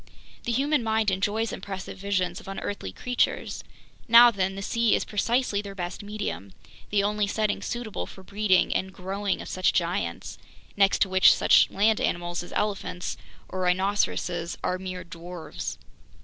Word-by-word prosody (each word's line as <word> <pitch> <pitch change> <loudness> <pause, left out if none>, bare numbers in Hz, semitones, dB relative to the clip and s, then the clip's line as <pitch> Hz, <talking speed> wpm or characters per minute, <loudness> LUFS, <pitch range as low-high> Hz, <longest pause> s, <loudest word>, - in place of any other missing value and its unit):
The 240 - 0
human 280 +3 +2
mind 220 -2 +1
enjoys 210 +4 0
impressive 190 0 -6
visions 185 -1 -1
of 220 - -15
unearthly 195 - -4
creatures. 250 - -1 0.4
Now 235 +1 +9
then, 190 -2 -1
the 195 - -5
sea 230 +1 +2
is - - -1
precisely 225 0 0
their 200 -1 -8
best 175 -1 -5
medium, 205 - -5 0.4
the 205 -1 +2
only 210 0 +1
setting 210 0 0
suitable 240 -3 -4
for 190 - -12
the - - -19
breeding 200 -2 +3
and 190 0 -1
growing 195 +2 -3
of - - -10
such 185 0 +1
giants—next 175 - -1
to 195 - -5
which 190 0 +7
such - - +5
land 215 +2 +2
animals 175 0 -1
as 175 - -10
elephants 200 -3 -2 0.3
or 185 - -6
rhinoceroses 180 -2 0
are 185 - -1
mere 185 -1 -5
dwarves. 165 - -7
195 Hz, 155 wpm, -26 LUFS, 180-210 Hz, 0.4 s, Now